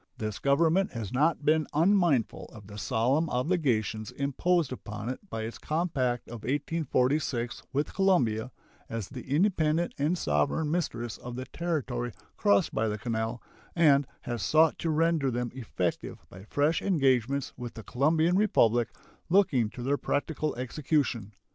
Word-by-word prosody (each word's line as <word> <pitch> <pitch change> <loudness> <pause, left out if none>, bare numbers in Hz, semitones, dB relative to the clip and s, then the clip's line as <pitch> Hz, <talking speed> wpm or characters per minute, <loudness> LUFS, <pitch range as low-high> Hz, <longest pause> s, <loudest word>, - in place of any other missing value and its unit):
This 110 -2 -4
Government 165 +7 +2
has 115 -2 -5
not 150 +3 +2
been 155 0 +3
unmindful 170 - +2
of 110 -2 -12
the 105 +1 -9
solemn 135 +11 +1
obligations 125 - 0
imposed 140 +3 0
upon 105 -2 -6
it 130 - -4
by 110 - -4
its 115 +1 -6
compact 140 -7 -1
of 120 -2 -8
1846 135 -3 0
with 145 +2 -1
Colombia, 130 - +2 0.4
as 115 -4 -4
the 130 -1 -9
independent 160 0 +2
and 155 +6 +1
sovereign 75 - 0
mistress 120 -9 -2
of 125 0 -8
the 130 +1 -5
territory 135 -9 -3 0.2
crossed 100 0 +2
by 110 - +1
the 105 0 -2
canal, 110 +1 -3 0.3
and 145 -5 +5
has 120 -3 -4
sought 155 - +3
to 165 - -1
render 160 -2 +2
them 120 -1 -2
effective 120 - -3
by 95 +2 -11
fresh 145 +7 +1
engagements 135 - +1
with 120 -2 -7
the 110 - -8
Colombian 155 - +2
Republic 120 - +3 0.4
looking 160 - +3
to 120 - -8
their 140 +3 +1
practical 155 +1 -2
execution. 125 -4 -1
135 Hz, 145 wpm, -29 LUFS, 115-160 Hz, 0.4 s, and